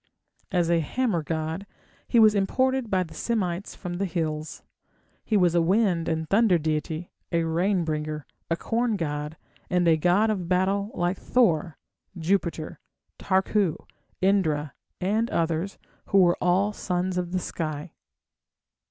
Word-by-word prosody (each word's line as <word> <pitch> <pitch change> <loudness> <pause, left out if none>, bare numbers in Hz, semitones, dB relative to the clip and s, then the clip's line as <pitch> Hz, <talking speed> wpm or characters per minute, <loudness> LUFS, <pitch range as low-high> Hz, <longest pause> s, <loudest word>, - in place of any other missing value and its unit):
As 175 -3 +2
a 170 - +4
hammer 200 - 0
god, 160 +4 -3 0.4
he - - +2
was 215 -2 +7
imported 260 +5 +1
by 185 -2 +2
the 165 - -12
Semites 195 -5 -2
from 175 -2 -5
the 195 - 0
hills. 155 -3 -3 0.6
He 215 - +1
was 180 -3 +3
a 170 - +4
wind 180 -2 +2
and 160 -1 -1
thunder 200 0 +4
deity, 155 +1 -2 0.2
a 170 -1 +2
rain 175 +3 +1
bringer, 150 -1 -3 0.2
a 165 - +2
corn 230 +2 0
god, 150 -3 -3 0.3
and 180 -1 +2
a 160 -1 +5
god 180 +7 +3
of 180 -5 -3
battle 195 +2 +1
like 175 +2 0
Thor, 170 - +2 0.4
Jupiter, 170 -2 -1 0.4
Tarku, 190 -2 +1 0.5
Indra, 160 -7 +1 0.3
and 215 +5 0
others, 165 +4 -1 0.3
who 200 - +2
were 175 -2 +5
all 190 +4 +2
sons 180 -1 -1
of 175 -1 -4
the 185 - 0
sky. 155 -2 -4
180 Hz, 145 wpm, -26 LUFS, 160-200 Hz, 0.6 s, was